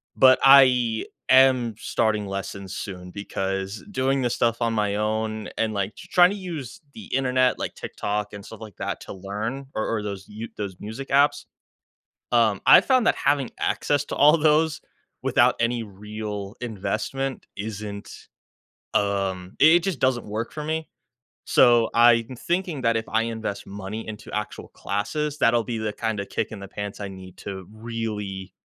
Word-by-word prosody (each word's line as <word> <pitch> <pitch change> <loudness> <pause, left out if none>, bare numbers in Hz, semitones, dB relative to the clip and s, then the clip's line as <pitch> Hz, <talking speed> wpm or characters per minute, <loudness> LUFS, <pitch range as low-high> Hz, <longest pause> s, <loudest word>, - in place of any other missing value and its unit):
but 130 0 +6
I 125 -5 +6 0.2
am 130 -3 +5
starting 105 -2 0
lessons 100 -1 -5
soon 90 -3 -7
because 95 +1 -4
doing 135 -5 +1
this 120 - 0
stuff 115 0 +1
on 115 -1 +1
my 105 -2 0
own 110 0 -2
and, 110 -1 0
like, 100 0 -2
tr - - -12
trying 180 0 +7
to - - -3
use 170 - -7
the 220 - -10
internet, 130 -1 +2
like - - -4
TikTok 105 0 -4
and 100 -1 -8
stuff 110 -1 -11
like 110 -4 -10
that, - - -4
to - - -8
learn 105 +8 -5
or 110 - -1
or 105 - -4
those 100 -2 -5
you 110 +2 -7
those 100 -3 -5
music 110 +6 -7
apps. 145 +1 +3 0.9
Um, 110 -4 +3
I - - +10
found 255 -4 +3
that - - +4
having 140 -2 +1
access 145 -1 0
to - - -5
all 150 +3 +6
those 155 0 +3 0.4
without - - +4
any 115 0 +1
real 105 0 -7
investment 115 +4 -3
isn't, 105 -1 -6 0.9
um 95 -2 0
i - - +6
it 165 +3 +7
just 190 -7 -1
doesn't 130 -2 +1
work 110 +3 -4
for 150 - -5
me. 160 +1 -2 0.6
So, 120 -3 +5
I'm 120 +1 +4
thinking 170 0 -2
that 115 -1 +2
if 110 - -3
I 110 +1 +2
invest 110 -3 -4
money 100 +2 -6
into 105 -1 -8
actual 105 0 -4
classes, 150 +9 -3
that'll 115 0 +3
be 115 +1 -3
the 110 -1 -2
kinda 110 -2 -2
kick - - -3
in 105 - -7
the 100 - -8
pants 105 0 -6
I 100 - -4
need 95 -1 -11
to 95 -2 -7
really, 110 -4 -5
110 Hz, 170 wpm, -24 LUFS, 100-130 Hz, 0.9 s, I